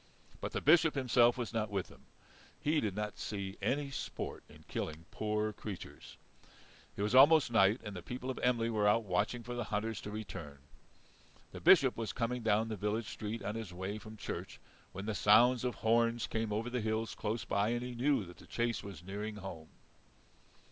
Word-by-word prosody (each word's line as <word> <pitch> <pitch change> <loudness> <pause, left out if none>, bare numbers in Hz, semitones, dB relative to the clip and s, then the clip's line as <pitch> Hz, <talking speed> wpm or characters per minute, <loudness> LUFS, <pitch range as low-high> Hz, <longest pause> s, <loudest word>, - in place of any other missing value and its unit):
But - - -4
the - - -1
Bishop 160 +1 +5
himself 125 -2 +4
was 120 -2 -4
not 110 -2 -1
with 100 -3 -1
them. - - -18 0.5
He 150 +1 +2
did 105 -4 -2
not 105 0 -4
see 100 -2 -5
any 140 0 0
sport - - -5
in - - -16
killing 80 +1 -4
poor 105 0 -1
creatures. 100 -2 -8 0.8
It 100 - -2
was 105 +3 0
almost 140 +1 +7
night, 105 +1 +4
and 105 -3 -6
the 90 - -6
people 125 +7 -5
of 130 - -7
Emly 115 -2 +1
were 105 -2 +2
out 115 +3 +4
watching 105 +5 -1
for 120 +2 -6
the 120 -2 -3
hunters 105 +1 -2
to - - -6
return. 95 -9 -7 0.9
The - - -9
Bishop - - +6
was 115 -1 -3
coming 125 +1 -1
down 110 0 +2
the 110 - -2
village 105 +2 -2
street 110 +2 -5
on 105 - -2
his 110 -4 -5
way 95 +4 -4
from 110 +1 -11
church, - - -6 0.3
when 95 +2 -6
the 110 - -1
sounds 120 +5 +5
of 125 -1 -1
horns 115 +1 +2
came 110 -1 -2
over 110 +4 -2
the 125 -1 -1
hills 110 0 -1
close 110 +2 -3
by, 100 +2 +1
and 120 +1 -1
he 125 0 -5
knew 125 -2 +1
the 90 0 -13
chase 120 -1 -1
was 100 -4 -9
nearing 105 +3 -5
home. 95 -6 -8
110 Hz, 195 wpm, -34 LUFS, 105-120 Hz, 0.9 s, almost